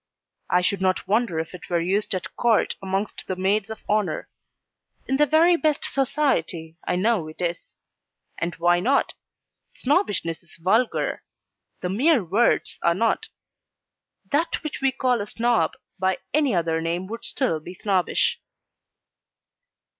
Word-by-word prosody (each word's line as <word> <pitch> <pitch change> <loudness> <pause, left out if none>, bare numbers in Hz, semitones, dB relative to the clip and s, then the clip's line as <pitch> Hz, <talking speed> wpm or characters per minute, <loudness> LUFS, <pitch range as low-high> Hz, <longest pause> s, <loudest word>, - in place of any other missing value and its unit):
I 180 - +3
should 190 +1 0
not 185 -1 +1
wonder 215 -4 +1
if 165 +2 -5
it 180 - -10
were 175 -1 +2
used 190 +4 0
at 185 - -5
Court 235 -3 +2
amongst 195 +2 -3
the 185 - -2
Maids 195 +3 +1
of 220 -1 -8
Honour. 205 -7 0 0.8
In 270 - 0
the 295 +1 +4
very 330 +4 +5
best 310 -3 +1
society 245 - 0
I - - +1
know 190 -3 +1
it 155 - -11
is. 175 -1 -3 0.6
And 170 0 -2
why 175 +1 +3
not? 265 +9 +2 0.6
Snobbishness 250 - 0
is 170 - -13
vulgar 215 +8 +1 0.6
the 180 - -2
mere 255 - +3
words 200 +8 +2
are 170 0 +3
not: 230 - 0 1.0
that 325 +4 0
which 305 - -5
we 270 0 +3
call 250 -3 +1
a 205 - -4
Snob, 235 +1 +1 0.3
by 190 0 +1 0.2
any 285 -7 +2
other 165 -1 0
name 170 +3 -2
would 230 +4 -7
still 245 - 0
be 175 +4 -10
Snobbish. 195 - +1
200 Hz, 145 wpm, -24 LUFS, 175-255 Hz, 1.0 s, very